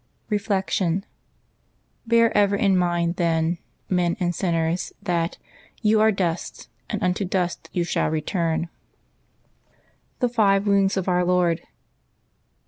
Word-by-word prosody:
Reflection. 195 -3 0 0.5
— - - -39
Bear 230 0 +4
ever 200 -1 +4
in 200 -1 +2
mind, 175 -1 +1
then, 165 0 +1 0.3
men 180 0 +1
and 175 -1 0
sinners, 165 -1 -1
that 175 -4 -1 0.5
"you 215 0 +4
are 220 0 +5
dust, 180 -4 -3 0.2
and - - -3
unto 180 +2 +1
dust 180 -2 -2
you 175 - 0
shall 170 - 0
return/' 165 +1 -1 1.5
THE 250 - +1
FIVE 205 -4 +2
WOUNDS 200 -1 +2
OF 190 - -2
OUR 180 -1 +2
LORD. 175 -2 +2
180 Hz, 125 wpm, -23 LUFS, 170-200 Hz, 1.5 s, are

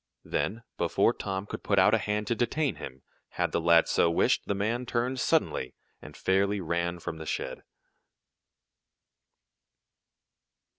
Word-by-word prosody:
Then, 115 +4 -2 0.2
before - - +2
Tom 95 -1 -4
could - - -7
put 100 - 0
out 100 +3 +5
a 115 - +4
hand 105 0 -1
to 120 - 0
detain 135 +5 0
him, 65 0 -9 0.3
had - - +1
the - - 0
lad 85 0 +5
so 85 - +3
wished, 85 - +2
the 100 - 0
man 115 +5 -1
turned 125 +3 -1
suddenly, 65 - 0 0.3
and - - -11
fairly 100 +2 +1
ran 85 0 -1
from 85 -1 -6
the 80 - -7
shed. - - -3
100 Hz, 145 wpm, -28 LUFS, 85-115 Hz, 0.3 s, out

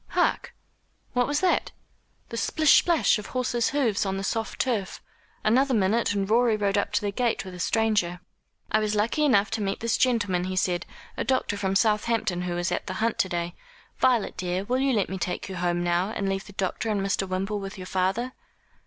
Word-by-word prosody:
Hark! - - 0 0.6
what 245 -1 +2
was 290 +2 0
that? 370 - +1 0.6
The 230 - -6
splish 310 +5 +4
splash 335 -9 +3
of 210 - -8
horses' 245 -2 0
hoofs 255 -8 +1
on 195 -1 -2
the 195 - -4
soft 225 +2 -2
turf. 220 -7 -1 0.4
Another 255 +4 +3
minute 210 +2 +2
and 195 -1 0
Rorie 230 0 +3
rode 200 -1 0
up 200 0 0
to - - +2
the 205 -1 -1
gate 235 0 -1
with 185 - -8
a 180 - -9
stranger. 205 -4 +1 0.5
"I 215 - +4
was 215 0 0
lucky 225 +8 +1
enough 210 -8 +3
to 225 -1 -2
meet 195 -1 -2
this 230 0 0
gentleman," 205 -8 +1
he 185 0 -3
said, 180 -2 0 0.3
"a - - 0
doctor 255 -4 0
from 195 -1 -1
Southampton, 215 -3 +1
who 180 -1 -2
was 175 0 -1
at - - -2
the - - -3
hunt 225 +3 -1
to 185 - +2
day. 170 0 -2 0.5
Violet 250 -4 +2
dear, 185 +1 -2
will 250 +5 0
you 270 0 +2
let 205 -5 +1
me 190 0 -5
take 180 - -3
you 190 -2 -6
home 175 0 0
now, 175 +2 +1
and 200 -3 -3
leave 195 0 -2
the 200 - -12
doctor 195 +3 -2
and 205 -2 0
Mr. 195 0 0
Wimble 195 +3 -2
with 195 0 -7
your 185 - -7
father?" 190 +8 -1
205 Hz, 215 wpm, -26 LUFS, 190-230 Hz, 0.6 s, splish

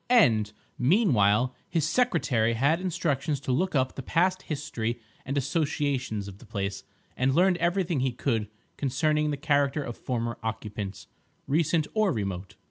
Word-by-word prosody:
And, 115 - +5 0.3
meanwhile, 125 - +3 0.2
his 160 -3 +1
secretary 135 - +2
had 145 +9 +2
instructions 150 -5 -1
to 135 - -2
look 180 +7 +1
up 130 -1 +2
the - - -6
past 185 +7 +1
history 120 -6 -3 0.3
and 135 +2 -1
associations 140 - -1
of 100 0 -10
the - - -14
place, 100 -3 -3 0.3
and 130 +1 +1
learn 180 +2 +5
everything 175 -2 +1
he 130 0 +1
could 115 -4 -1 0.3
concerning 150 +3 +1
the 145 - -1
character 145 0 +1
of 120 -3 -5
former 120 -2 -3
occupants, 105 -3 -5 0.4
recent 155 +2 +2
or 215 -3 +3
remote. 100 - -4
135 Hz, 145 wpm, -27 LUFS, 115-160 Hz, 0.4 s, And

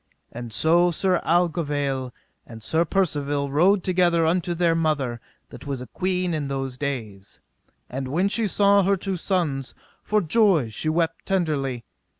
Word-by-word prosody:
And 120 0 -7
so 165 - +3
Sir 180 +1 0
Aglovale 145 -6 0 0.4
and 115 -2 -11
Sir 160 +8 +1
Percivale 145 -6 -1
rode 180 +7 +3
together 175 -3 +2
unto 175 +1 0
their 170 -1 +2
mother 145 -8 -1 0.3
that - - -11
was 140 -2 -3
a 125 - -7
queen 180 +6 -2
in 150 -3 -2
those 135 -2 -3
days. 115 -8 -5 0.5
And 130 +1 -5
when 170 +9 +1
she 220 +2 0
saw 200 +1 +4
her 195 +1 +2
two 190 +1 -3
sons, 165 -8 -2 0.3
for 215 - +1
joy 180 - +3
she 135 +8 -3
wept 165 0 -1
tenderly. 145 -10 -1
160 Hz, 155 wpm, -24 LUFS, 135-180 Hz, 0.5 s, saw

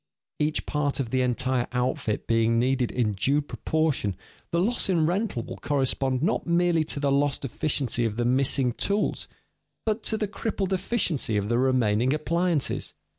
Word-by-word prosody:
Each 150 +1 0
part 145 -2 -1
of 120 -4 -2
the 130 - +2
entire 125 0 0
outfit 125 -4 -1
being 115 0 +2
needed 125 0 +1
in 115 -4 0
due 135 +9 +2
proportion, 150 -7 -1 0.3
the 170 - -1
loss 220 +3 +1
in 170 -4 +3
rental 180 - -1
will - - -8
correspond 135 -1 0
not 175 - 0
merely 170 -1 +3
to 150 - -3
the 140 -1 +1
lost 140 0 +1
efficiency 135 -2 0
of 110 -1 -1
the 120 - 0
missing 130 0 +3
tools, 200 - -1 0.6
but 220 0 0
to 220 - 0
the 210 - -1
crippled 200 -2 -2
efficiency 175 - 0
of 105 +1 -1
the 120 +1 +2
remaining 125 0 +2
appliances. 170 0 -1
140 Hz, 165 wpm, -26 LUFS, 125-170 Hz, 0.6 s, in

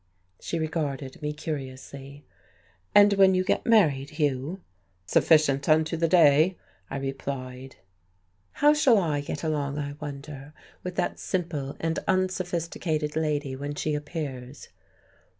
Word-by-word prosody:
She 170 - -3
regarded 150 -4 -3
me 150 0 -2
curiously. 140 -1 -7 0.7
"And 205 0 +7
when 190 -1 +5
you 185 - +2
get - - -1
married, 150 - +4
Hugh?" 150 +3 -2 0.4
"Sufficient 140 - +3
unto 155 +1 +3
the 165 0 +1
day," 160 +1 +5 0.3
I - - -4
replied. 135 -1 -5 0.8
"How 295 +1 +5
shall 280 -6 +4
I 155 -7 0
get 145 +1 -5
along, 145 -3 -1
I 145 -1 -3
wonder, 145 0 -8 0.3
with 180 -1 -6
that - - -1
simple 160 -7 -3
and 165 0 -1
unsophisticated 175 -4 -1
lady 150 -4 -1
when 145 +2 -5
she 155 +1 -1
appears?" 145 -3 -6
150 Hz, 125 wpm, -26 LUFS, 140-170 Hz, 0.8 s, And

